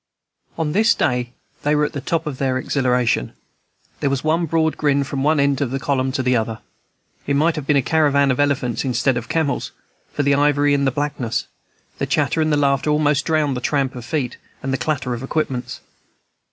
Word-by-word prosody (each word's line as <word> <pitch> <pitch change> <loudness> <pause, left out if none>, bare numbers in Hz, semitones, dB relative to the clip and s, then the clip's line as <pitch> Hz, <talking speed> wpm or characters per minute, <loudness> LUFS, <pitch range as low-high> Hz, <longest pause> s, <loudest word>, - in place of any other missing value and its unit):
On 160 -2 -1
this 220 +6 +3
day 125 -3 0 0.3
they 150 +1 +1
were 150 0 +3
at - - -5
the 140 - -4
top 165 +4 -1
of 140 -3 -5
exhilaration. 130 - 0 0.7
There 140 - +1
was 135 -1 -1
one 165 +2 +1
broad 160 0 +1
grin 140 -2 +1
from 140 0 -4
one 150 +2 +2
end 140 -1 +2
of 140 - 0
the 135 +2 -2
column 135 -2 0
to 130 -2 -1
the 125 0 +2
other; 110 -1 -1 0.7
it 140 - +1
might 160 +4 +3
soon 155 - -4
have 135 - -14
been 150 - +4
a 135 - +2
caravan 140 -3 +3
of 130 - -2
elephants 135 -5 0
instead 125 0 +1
of 120 -1 -4
camels, 160 -4 -1 0.4
for 145 - -1
the 140 0 +3
ivory 145 0 +3
and 140 -1 +2
the - - +2
blackness; 145 -4 -2 0.5
the - - -1
chatter 160 - +1
and 155 0 +1
the 150 - +3
laughter 140 0 +1
almost 150 -2 +2
drowned 155 -4 +1
the 125 - -4
tramp 135 -1 0
of 125 - -8
feet 125 -1 -2 0.3
and 135 0 -2
the - - +1
clatter 130 -2 -1
of 120 - -5
equipments. 130 -3 -3
140 Hz, 210 wpm, -20 LUFS, 130-150 Hz, 0.7 s, been